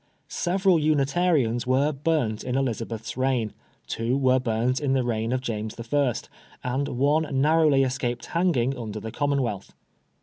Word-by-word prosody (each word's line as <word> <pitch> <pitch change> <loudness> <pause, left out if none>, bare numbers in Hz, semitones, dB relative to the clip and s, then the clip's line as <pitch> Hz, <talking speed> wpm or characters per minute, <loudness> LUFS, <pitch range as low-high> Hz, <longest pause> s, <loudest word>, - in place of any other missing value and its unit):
Several 185 -1 +2
Unitarians 145 -5 +1
were 135 +4 +3
burnt 140 -7 -1
in 125 0 -2
Elizabeth's 115 -4 -3
reign, 130 -4 0 0.3
two 115 +3 -1
were 130 -1 +3
burnt 125 +1 0
in 140 -3 0
the 130 -1 +2
reign 115 -1 -1
of 130 0 0
James 110 -3 -4 0.2
L, 140 -4 +3 0.5
and 130 +3 -1
one 145 +4 +1
narrowly 150 -1 +4
escaped 125 -2 -2
hanging 160 -7 +1
under 110 -3 -5
the 110 +1 -6
Commonwealth. 135 -8 -1
130 Hz, 140 wpm, -25 LUFS, 120-145 Hz, 0.5 s, narrowly